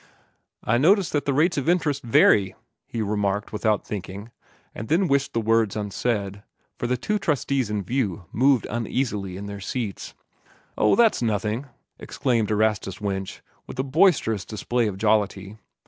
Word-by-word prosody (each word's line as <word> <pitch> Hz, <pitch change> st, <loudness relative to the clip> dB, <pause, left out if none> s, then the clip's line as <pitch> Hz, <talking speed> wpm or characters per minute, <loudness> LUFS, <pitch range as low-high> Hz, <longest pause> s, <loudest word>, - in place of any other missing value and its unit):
"I 115 Hz, +2 st, +2 dB
notice 190 Hz, +5 st, +4 dB
that 145 Hz, -, -1 dB
the 140 Hz, -, +1 dB
rates 160 Hz, +1 st, +2 dB
of 140 Hz, -, -1 dB
interest 150 Hz, -6 st, +1 dB
vary," 100 Hz, -4 st, +4 dB, 0.3 s
he 115 Hz, -2 st, -3 dB
remarked 105 Hz, 0 st, -1 dB
without 105 Hz, 0 st, 0 dB
thinking, 100 Hz, +2 st, -7 dB, 0.4 s
and 110 Hz, -, -7 dB
then 175 Hz, +5 st, +2 dB
wished 140 Hz, -1 st, +1 dB
the 115 Hz, -, +1 dB
words 110 Hz, -2 st, +2 dB
unsaid, 105 Hz, -1 st, -2 dB, 0.4 s
for 120 Hz, -, -1 dB
the 125 Hz, +1 st, 0 dB
two 210 Hz, -, -1 dB
trustees 140 Hz, -, 0 dB
in 105 Hz, -1 st, -2 dB
view 100 Hz, -5 st, -2 dB
moved 130 Hz, -1 st, +3 dB
uneasily 110 Hz, -5 st, -2 dB
on 100 Hz, -, -7 dB
their 100 Hz, 0 st, -7 dB
seats. 110 Hz, -1 st, -5 dB, 0.6 s
"Oh, 105 Hz, -, +3 dB
that's 230 Hz, -, +3 dB
nothing," 110 Hz, +3 st, -1 dB, 0.3 s
exclaimed 115 Hz, -5 st, -1 dB
Erastus 105 Hz, -3 st, 0 dB
Winch, 95 Hz, -2 st, -4 dB, 0.2 s
with -, -, -9 dB
a 130 Hz, -, 0 dB
boisterous 140 Hz, -, +2 dB
display 115 Hz, +3 st, -1 dB
of 100 Hz, -2 st, -4 dB
jollity. 105 Hz, -1 st, 0 dB
110 Hz, 155 wpm, -24 LUFS, 100-135 Hz, 0.6 s, notice